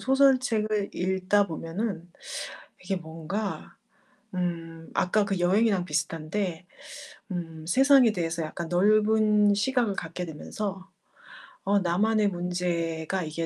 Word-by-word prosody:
소설책을 255 -6 +2
읽다 190 +2 +1
보면은 170 +2 -4 0.7
이게 190 +1 -1
뭔가 165 +5 -5 0.6
음 165 -2 -4
아까 205 +3 +2
그 195 -2 -1
여행이랑 190 +1 +3
비슷한데 165 +3 -2 0.6
음 165 -3 -5
세상에 265 - +6
대해서 170 -3 -2
약간 165 +2 -5
넓은 210 +2 +4
시각을 235 -1 +1
갖게 165 +1 -5
되면서 190 +5 -5 0.8
'어 200 +1 +3
나만의 205 +4 +2
문제가 175 -1 -2
이게 160 +1 -3
185 Hz, 235 characters per minute, -27 LUFS, 165-210 Hz, 0.8 s, 세상에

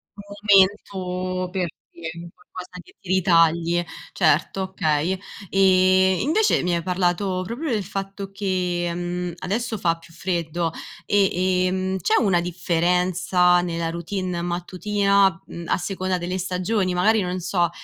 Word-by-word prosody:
Momento, 190 -3 +1
per 180 -2 -1 0.2
dire 165 -1 -7
un 170 0 -8
qualcosa 180 0 -11
che - - -20
ti 195 - -14
ritagli. 170 -2 +3 0.3
Certo, 165 +2 +2
okay. 185 -1 0 0.3
Ehm, 185 -1 +4
invece 410 +10 +2
mi 175 -1 0
hai 170 - -1
parlato 185 +1 0
proprio 270 +7 -4
del 215 -3 0
fatto 195 +1 -6
che, 180 -3 -1
mhmm, 175 0 -3
adesso 220 +4 -2
fa 170 -3 +1
più 165 0 -18
freddo. 170 -2 -2 0.4
E, 185 -2 +2
ehm, 185 +1 -1
c'è 175 - +2
una 180 -5 +2
differenza 180 +1 +2
nella 170 -1 -2
routine 175 +1 -3
mattutina, 190 +2 +1
mhmm, 170 - -8
a - - +1
seconda 185 0 -2
delle 180 +1 -3
stagioni? 185 +1 -1
Magari 210 +4 +3
non 180 0 -3
so, 175 -1 0
185 Hz, 135 wpm, -23 LUFS, 175-195 Hz, 0.4 s, Ehm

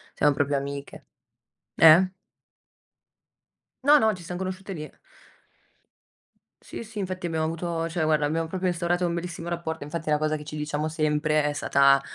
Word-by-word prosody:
Siamo 145 0 +3
proprio 140 0 0
amiche. 140 0 -6 0.7
Eh? 170 +4 +7 1.7
No, 290 +2 +7
no, 220 -3 +3
ci 180 -3 -10
siam 175 +1 -6
conosciute 190 +1 -5
lì. 155 -3 -7 1.7
Sì, - - -8
sì, 220 -1 -8
infatti 185 -2 -4
abbiamo 160 -1 -1
avuto 165 0 -2
cioè 165 0 -2
guarda, 155 -1 +2
abbiam 165 +2 -1
proprio 185 +2 -2
instaurato 175 +1 0
un 170 - -2
bellissimo 170 0 -5
rapporto. 165 -3 -4
Infatti 165 +2 -6
è - - +1
una 150 - +4
cosa 155 0 0
che 150 - -6
ci 150 0 -7
diciamo 150 +1 -2
sempre 155 -1 +1
è 150 - 0
stata 140 -1 +4
160 Hz, 165 wpm, -26 LUFS, 150-175 Hz, 1.7 s, Eh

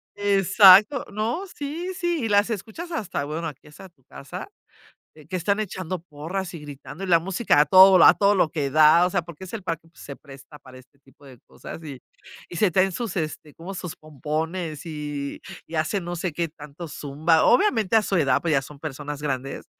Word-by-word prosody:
Exacto. 205 +4 +5
No, 220 - -2
sí, 320 +6 -5
sí, 345 -7 -2
y - - -2
las 205 +2 +3
escuchas 225 - -6
hasta 215 - -3
bueno, 155 +3 -4
aquí 150 -2 -11
hasta 150 +6 -13
tu 150 -6 -36
casa, 140 - -9 0.7
eh, 155 -2 -17
que 185 - -4
están 200 +4 0
echando 185 -3 -4
porras 170 +3 -6
y 165 - -7
gritando 145 +4 -9
y - - -5
la 170 -2 +5
música 185 0 +1
a 150 - +4
todo 190 +5 +8
vol 185 -2 +6
a - - +8
todo 200 0 +3
lo 180 -5 +2
que 145 -5 -2
da. 155 +4 +6
O - - -2
sea, 175 - 0
porque 170 +1 -11
es 185 - -11
el 225 -3 -6
parque, 165 -2 -5
pues, 165 - -20
se 140 - -9
presta 140 +1 -14
para 130 -2 -15
este 130 +2 -21
tipo 140 +1 -23
de 130 -3 -14
cosas 165 - -11
y 140 -4 -9 0.5
y 175 - -9
se 195 +2 +2
traen 190 +2 +2
sus 220 0 -5
este, 155 -2 -5
como 180 +4 -9
sus 180 -2 -7
pompones 155 +2 -5
y 145 -3 -5 0.3
y 165 - -12
hacen 165 +4 -1
no 175 0 -5
sé 175 0 -3
qué 170 +2 -2
tanto 150 +2 -11
zumba. 155 +3 +1
Obviamente, 230 - +3
a 220 - +4
su 195 - -1
edad, 140 -5 +2
pues, 165 0 -1
ya 135 -2 +2
son 145 +1 -12
personas 145 -1 -6
grandes, 135 -2 -4
165 Hz, 215 wpm, -24 LUFS, 150-195 Hz, 0.7 s, todo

